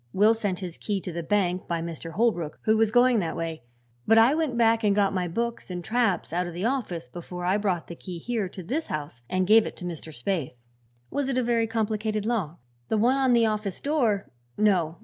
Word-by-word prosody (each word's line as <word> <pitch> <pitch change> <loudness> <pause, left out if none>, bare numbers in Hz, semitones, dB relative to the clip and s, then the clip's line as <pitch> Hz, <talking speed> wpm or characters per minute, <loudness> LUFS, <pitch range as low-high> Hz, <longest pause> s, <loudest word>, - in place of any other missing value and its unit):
Will 210 +3 +5
sent 205 -5 -2
his 175 -3 -6
key 205 -2 -1
to 180 - -5
the 170 +1 -4
bank 185 0 0
by 170 -1 -1
Mr. 165 0 -6
Holbrook, 175 -8 0
who 220 - +3
was 220 -1 +3
going 245 +1 +4
that 170 -4 -2
way, 165 -3 -4 0.5
but 225 - +6
I 230 +5 +6
went 305 -6 0
back 225 -1 +3
and 205 -2 +3
got 200 -2 +2
my 180 -2 -1
books 235 +7 -3
and 180 -1 -5
traps 225 -7 0
out 175 +1 0
of 175 - -7
the 180 +4 -2
office 225 - -2
before 175 +5 -7
I 185 +3 +3
brought 190 -5 -1
the 170 - -8
key 180 0 -7
here 215 +1 -2
to 185 - -9
this 285 - -2
house 145 -6 -5
and 185 0 +1
gave 220 +3 +6
it - - -8
to 180 - -7
Mr. 165 -2 -6
Spaythe." 150 0 -3 0.6
"Was 285 -1 -1
it 260 - 0
a 255 - +2
very 230 -1 +1
complicated 215 -1 -1
lock?" 195 -9 -1 0.3
"The 220 - +2
one 250 +5 +3
on 260 -2 +3
the 235 -1 +5
office 215 -3 -2
door? 240 -9 0 0.3
No. 180 -6 +2
205 Hz, 225 wpm, -26 LUFS, 175-230 Hz, 0.6 s, but